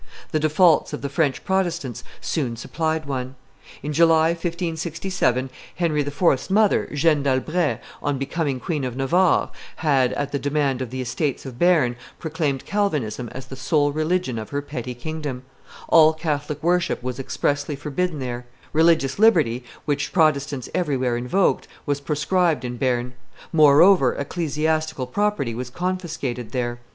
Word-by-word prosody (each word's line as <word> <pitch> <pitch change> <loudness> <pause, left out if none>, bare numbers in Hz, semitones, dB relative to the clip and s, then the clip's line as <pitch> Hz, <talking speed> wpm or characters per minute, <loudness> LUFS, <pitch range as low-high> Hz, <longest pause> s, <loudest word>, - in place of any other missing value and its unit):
The 155 - +1
defaults 155 +1 +3
of 145 - -5
the 140 - -2
French 140 -1 0
Protestants 170 - -1 0.2
soon 130 -8 -2
supplied 160 +6 -2
one. 130 -2 -4 0.5
In 150 - -3
July, 165 0 +5
1567, 165 -5 -1 0.2
Henry 160 -4 +1
IV.'s 145 +1 +1
mother, 210 +1 +3
Jeanne 150 0 +2
d'Albret, 140 0 0 0.2
on 145 -1 -1
becoming 140 0 -2
Queen 155 -2 -2
of 125 -1 -4
Navarre, 170 +7 +2 0.2
had, 135 -5 +2
at 145 0 -3
the 140 - -1
demand 140 -2 0
of 130 - -3
the 130 +1 -4
Estates 130 +4 -2
of 130 -2 -8
Bearn, 160 -9 +3 0.2
proclaimed 150 -4 -2
Calvinism 145 - -1
as 130 +3 -8
the 130 - -9
sole 145 +3 +1
religion 155 -4 -1
of 110 - -7
her 145 0 -3
petty 125 -3 -5
kingdom; 145 -1 -5 0.4
all 160 -1 +6
Catholic 150 -2 -3
worship 175 -5 +1
was 125 +1 -4
expressly 145 +2 -1
forbidden 150 +4 -2
there; 125 -2 -5 0.3
religious 160 -2 +3
liberty, 155 - +4 0.2
which 145 -1 -1
Protestants 145 -5 +1
everywhere 130 -8 0
invoked, 125 +11 +1 0.2
was 145 -1 -1
proscribed 150 -1 +1
in 125 0 -4
Bearn; 125 -1 0 0.4
moreover, 155 0 +6
ecclesiastical 155 -1 -1
property 200 - -1
was 125 +2 -5
confiscated 155 - -4
there. 120 -1 -2
145 Hz, 140 wpm, -23 LUFS, 130-165 Hz, 0.5 s, all